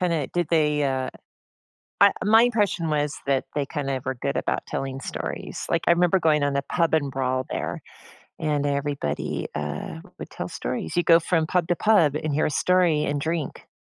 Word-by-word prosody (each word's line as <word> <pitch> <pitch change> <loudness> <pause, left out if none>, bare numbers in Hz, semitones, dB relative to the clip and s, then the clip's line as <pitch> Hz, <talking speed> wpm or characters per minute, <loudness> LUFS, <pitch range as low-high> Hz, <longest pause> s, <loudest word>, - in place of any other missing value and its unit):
kinda 165 -6 0
did 175 -3 -1
they, 150 -3 +2
uh 130 -1 -1 0.9
uh, - - +8
my 220 +3 +6
impression 210 -8 +1
was 150 -1 0
that 135 -1 +1
they 140 -2 0
kinda 135 -3 -3
were 130 0 -2
good 120 - -3
about - - -1
telling 135 0 -4
stories. - - -5
Like, 170 - +1
I - - +5
remember 175 +2 +4
going 150 -3 +3
on 145 - +1
the 140 0 0
pub 165 -2 +1
and 145 -3 +1
brawl 130 -1 -1
there, - - -3 0.6
and 145 -2 0
everybody, 140 - -2
uh, 75 +1 -4 0.2
would - - -8
tell - - -5
stories. 80 - -4
You 175 - +2
go 165 -1 +6
from 165 -1 +1
pub 175 0 0
to 175 - +1
pub 175 -9 +3
and 155 -1 -2
hear 155 - +2
a - - +1
story 170 -2 +2
and 145 0 -1
drink. 160 -1 -3
150 Hz, 190 wpm, -24 LUFS, 140-170 Hz, 0.9 s, uh